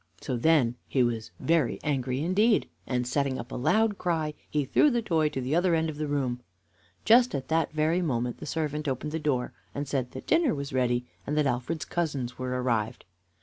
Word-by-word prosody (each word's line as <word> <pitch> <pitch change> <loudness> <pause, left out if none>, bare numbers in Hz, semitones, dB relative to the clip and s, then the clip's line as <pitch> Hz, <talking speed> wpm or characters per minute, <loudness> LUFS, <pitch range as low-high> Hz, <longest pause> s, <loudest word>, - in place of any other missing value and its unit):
So 130 - -3
then 125 -2 +3
he 130 - +2
was 115 -6 -1
very 160 -7 +1
angry 135 -2 -1
indeed, 210 +6 +3 0.2
and, 125 -1 0
setting 135 +1 0
up 120 +2 -7
a - - -4
loud 205 - +2
cry, 160 -4 0 0.2
he 150 -2 0
threw 295 - +4
the 240 -3 0
toy 160 -6 +2
to 135 - -4
the 130 +3 -2
other 175 +1 +3
end 160 0 0
of 145 - -10
the 150 0 -2
room. 135 -4 -1 0.7
Just 235 -1 +5
at 135 -1 -4
this 160 0 +2
very 155 +3 +1
moment 125 -7 -1
the - - -7
servant 150 -1 -2
opened 135 +3 -2
the 160 - -2
door 140 -5 -1 0.2
and 145 0 -3
said 130 -3 -1
that 130 - -8
dinner 325 - +3
was 140 -1 -5
ready, 125 -1 +1 0.2
and 150 - -1
that 150 - +3
Alfred's 130 +5 -1
cousins 140 -8 -2
were 125 0 -2
arrived. 115 -2 -1
145 Hz, 205 wpm, -28 LUFS, 125-160 Hz, 0.7 s, Just